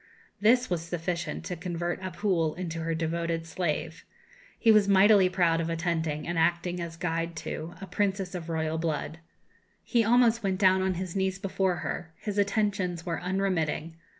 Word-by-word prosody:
This 240 Hz, +5 st, +4 dB
was 175 Hz, -3 st, -1 dB
sufficient 170 Hz, +1 st, -3 dB
to 180 Hz, -, -3 dB
convert 175 Hz, +1 st, -3 dB
Abhul 175 Hz, -3 st, -1 dB
into 170 Hz, -2 st, -4 dB
her 165 Hz, 0 st, -1 dB
devoted 165 Hz, 0 st, -2 dB
slave. 165 Hz, -2 st, -3 dB, 0.5 s
He 225 Hz, -, +5 dB
was 210 Hz, -2 st, +5 dB
mightily 200 Hz, -1 st, +6 dB
proud 170 Hz, -3 st, +2 dB
of 165 Hz, -, -2 dB
attending, 165 Hz, -2 st, -1 dB
and 170 Hz, -1 st, -1 dB
acting 175 Hz, +2 st, +1 dB
as 170 Hz, -1 st, -6 dB
guide 165 Hz, -1 st, -2 dB
to, 160 Hz, +2 st, -5 dB
a 195 Hz, -, -6 dB
princess 195 Hz, 0 st, -1 dB
of 170 Hz, -2 st, -6 dB
royal 160 Hz, 0 st, -1 dB
blood. 160 Hz, 0 st, -2 dB, 0.6 s
He 235 Hz, -2 st, +2 dB
almost 235 Hz, 0 st, +4 dB
went 190 Hz, -2 st, 0 dB
down 190 Hz, -1 st, +4 dB
on 190 Hz, -1 st, 0 dB
his 185 Hz, 0 st, -5 dB
knees 190 Hz, -1 st, 0 dB
before 190 Hz, -1 st, 0 dB
her; 160 Hz, -1 st, -5 dB
his 205 Hz, -1 st, -3 dB
attentions 200 Hz, -4 st, 0 dB
were 170 Hz, -2 st, -2 dB
unremitting. 180 Hz, -4 st, -1 dB
175 Hz, 165 wpm, -28 LUFS, 165-195 Hz, 0.6 s, mightily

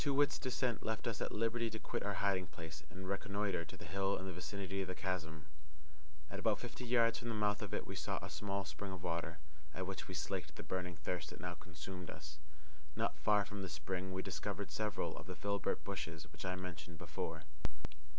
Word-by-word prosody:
Too 140 Hz, -2 st, +4 dB
wit's 145 Hz, +1 st, +6 dB
descent 125 Hz, -2 st, +2 dB
left 110 Hz, 0 st, 0 dB
us 115 Hz, -4 st, 0 dB
at -, -, +1 dB
liberty 115 Hz, +1 st, +3 dB
to 110 Hz, -, -3 dB
quit -, -, -1 dB
our 100 Hz, -1 st, +1 dB
hiding 95 Hz, -3 st, +3 dB
place 80 Hz, 0 st, -6 dB
and 95 Hz, +1 st, -6 dB
reconnoitre 100 Hz, -2 st, +1 dB
the -, -, -7 dB
hill 95 Hz, +3 st, +3 dB
in 95 Hz, -, -3 dB
the 95 Hz, -, -2 dB
vicinity 95 Hz, +2 st, -1 dB
of 95 Hz, -, -1 dB
the 90 Hz, -, -1 dB
chasm. 80 Hz, -5 st, -1 dB, 0.9 s
At 100 Hz, -, -2 dB
about 105 Hz, 0 st, +5 dB
fifty 120 Hz, +1 st, -5 dB
yards 115 Hz, -1 st, +6 dB
from 120 Hz, -, -2 dB
the 115 Hz, -, +1 dB
mouth 105 Hz, -1 st, +4 dB
of -, -, -2 dB
it -, -, +1 dB
we -, -, -3 dB
saw -, -, +1 dB
a -, -, -4 dB
small 100 Hz, -1 st, 0 dB
spring 100 Hz, -1 st, -3 dB
of 95 Hz, -3 st, -5 dB
water, 85 Hz, 0 st, 0 dB, 0.4 s
at 95 Hz, -, 0 dB
which 95 Hz, 0 st, -3 dB
we 95 Hz, -, -3 dB
slaked 90 Hz, +4 st, -1 dB
the -, -, -5 dB
burning 90 Hz, -1 st, -1 dB
thirst 85 Hz, +2 st, -1 dB
that -, -, -7 dB
now 90 Hz, -1 st, -1 dB
consumed 90 Hz, +1 st, -6 dB
us. 75 Hz, -1 st, -6 dB, 0.6 s
Not -, -, +1 dB
far 105 Hz, -1 st, +6 dB
from 105 Hz, -1 st, -4 dB
the 95 Hz, -, -2 dB
spring 90 Hz, +4 st, -1 dB
we 95 Hz, 0 st, 0 dB
discovered -, -, -1 dB
several 110 Hz, -2 st, +1 dB
of -, -, -6 dB
the -, -, -3 dB
filbert 100 Hz, 0 st, +1 dB
bushes -, -, -2 dB
which -, -, -6 dB
I 90 Hz, 0 st, +2 dB
mentioned 85 Hz, -3 st, -5 dB
before. 80 Hz, +1 st, -2 dB
95 Hz, 215 wpm, -40 LUFS, 90-105 Hz, 0.9 s, wit's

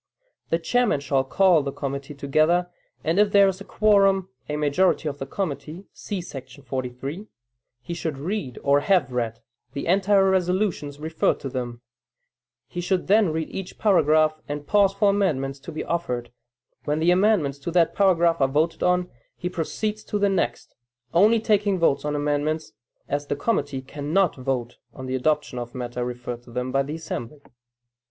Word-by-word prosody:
The 165 Hz, -, +2 dB
chairman 210 Hz, +1 st, +1 dB
shall 140 Hz, -1 st, +1 dB
call 175 Hz, +3 st, +4 dB
the 140 Hz, 0 st, -3 dB
committee 140 Hz, +1 st, -5 dB
together, 155 Hz, +6 st, +2 dB, 0.3 s
and 165 Hz, +5 st, +1 dB
if 205 Hz, -1 st, +4 dB
there 200 Hz, -1 st, +6 dB
is 190 Hz, 0 st, -2 dB
a -, -, -5 dB
quorum 195 Hz, -3 st, +3 dB, 0.2 s
(a 150 Hz, -, -1 dB
majority 150 Hz, +3 st, +2 dB
of 145 Hz, -1 st, -4 dB
the 135 Hz, -, -5 dB
committee, 170 Hz, +2 st, -4 dB
see 200 Hz, -4 st, -5 dB
§ 135 Hz, -3 st, -10 dB
43,) 130 Hz, -, -5 dB, 0.6 s
he 170 Hz, -, -5 dB
should 160 Hz, -4 st, -3 dB
read 150 Hz, -, -4 dB
or 140 Hz, 0 st, +4 dB
have 165 Hz, -4 st, +2 dB
read, 115 Hz, -2 st, -2 dB, 0.3 s
the 140 Hz, -, -4 dB
entire 195 Hz, +2 st, +4 dB
resolutions 180 Hz, -5 st, 0 dB
referred 160 Hz, +1 st, 0 dB
to 135 Hz, -, -4 dB
them; 120 Hz, -2 st, -5 dB, 0.9 s
he 175 Hz, -, -5 dB
should 180 Hz, +1 st, 0 dB
then 210 Hz, -1 st, +4 dB
read 160 Hz, 0 st, -3 dB
each 190 Hz, -2 st, -6 dB
paragraph, 155 Hz, -6 st, +3 dB
and 145 Hz, 0 st, -4 dB
pause 200 Hz, +1 st, +4 dB
for 200 Hz, +1 st, +3 dB
amendments 140 Hz, -9 st, 0 dB
to 165 Hz, -, -9 dB
be 155 Hz, -, -4 dB
offered; 125 Hz, -8 st, -3 dB, 0.5 s
when 150 Hz, 0 st, 0 dB
the 165 Hz, +3 st, +3 dB
amendments 180 Hz, -7 st, +2 dB
to 140 Hz, -, -5 dB
that 170 Hz, -1 st, +3 dB
paragraph 170 Hz, -5 st, +3 dB
are 135 Hz, -, +5 dB
voted 155 Hz, +5 st, 0 dB
on 180 Hz, 0 st, +2 dB, 0.3 s
he 180 Hz, -, -3 dB
proceeds 210 Hz, +5 st, -3 dB
to 210 Hz, -, -2 dB
the 200 Hz, 0 st, +2 dB
next, 170 Hz, -11 st, -2 dB, 0.4 s
only 210 Hz, +7 st, +5 dB
taking 205 Hz, -2 st, +2 dB
votes 165 Hz, -5 st, +2 dB
on 150 Hz, 0 st, -1 dB
amendments, 150 Hz, 0 st, -1 dB, 0.3 s
as 145 Hz, 0 st, -2 dB
the -, -, -1 dB
committee 145 Hz, -6 st, -1 dB
cannot 150 Hz, +7 st, 0 dB
vote 130 Hz, -2 st, -3 dB, 0.2 s
on 130 Hz, -, -7 dB
the 130 Hz, -, -4 dB
adoption 145 Hz, -1 st, 0 dB
of 120 Hz, +1 st, -7 dB
matter 125 Hz, -1 st, -4 dB
referred 120 Hz, -1 st, -5 dB
to 120 Hz, -, -18 dB
them 125 Hz, +2 st, -3 dB
by 135 Hz, +1 st, +2 dB
the 145 Hz, +3 st, -4 dB
assembly. 150 Hz, -3 st, -6 dB
155 Hz, 175 wpm, -24 LUFS, 135-190 Hz, 0.9 s, there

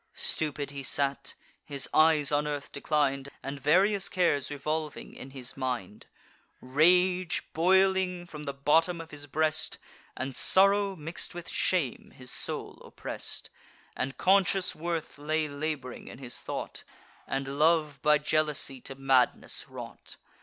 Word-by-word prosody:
Stupid 145 Hz, -2 st, -1 dB
he 140 Hz, -1 st, -6 dB
sate, 140 Hz, +1 st, -1 dB, 0.3 s
his 140 Hz, -3 st, -1 dB
eyes 155 Hz, -3 st, +5 dB
on 145 Hz, 0 st, +1 dB
earth 145 Hz, -1 st, -4 dB
declin'd, 140 Hz, -3 st, 0 dB
And 140 Hz, +1 st, -5 dB
various 190 Hz, +8 st, +3 dB
cares 170 Hz, -7 st, +1 dB
revolving 150 Hz, +1 st, -3 dB
in 130 Hz, -, -10 dB
his 130 Hz, -2 st, -4 dB
mind: 125 Hz, -7 st, -4 dB, 0.5 s
Rage, 180 Hz, +6 st, +3 dB
boiling 185 Hz, +1 st, +3 dB
from 150 Hz, -3 st, -9 dB
the 140 Hz, -, -3 dB
bottom 160 Hz, +5 st, +2 dB
of 165 Hz, 0 st, -9 dB
his 145 Hz, -1 st, -7 dB
breast, 155 Hz, +2 st, 0 dB, 0.4 s
And 130 Hz, 0 st, -4 dB
sorrow 195 Hz, +1 st, +4 dB
mix'd 165 Hz, +2 st, -5 dB
with 175 Hz, -1 st, -7 dB
shame, 160 Hz, -10 st, 0 dB
his 130 Hz, -1 st, -5 dB
soul -, -, -4 dB
oppress'd; -, -, -5 dB, 0.4 s
And 135 Hz, -1 st, -3 dB
conscious 190 Hz, 0 st, +3 dB
worth 165 Hz, -2 st, -4 dB
lay 155 Hz, +1 st, 0 dB
lab'ring 145 Hz, -3 st, -4 dB
in -, -, -9 dB
his 125 Hz, -2 st, -5 dB
thought, -, -, -5 dB, 0.4 s
And 135 Hz, +1 st, -3 dB
love 155 Hz, -3 st, +3 dB
by 150 Hz, +2 st, +5 dB
jealousy 150 Hz, -3 st, +1 dB
to 135 Hz, -, -8 dB
madness 135 Hz, -2 st, +1 dB
wrought. -, -, -9 dB
150 Hz, 135 wpm, -29 LUFS, 140-170 Hz, 0.5 s, eyes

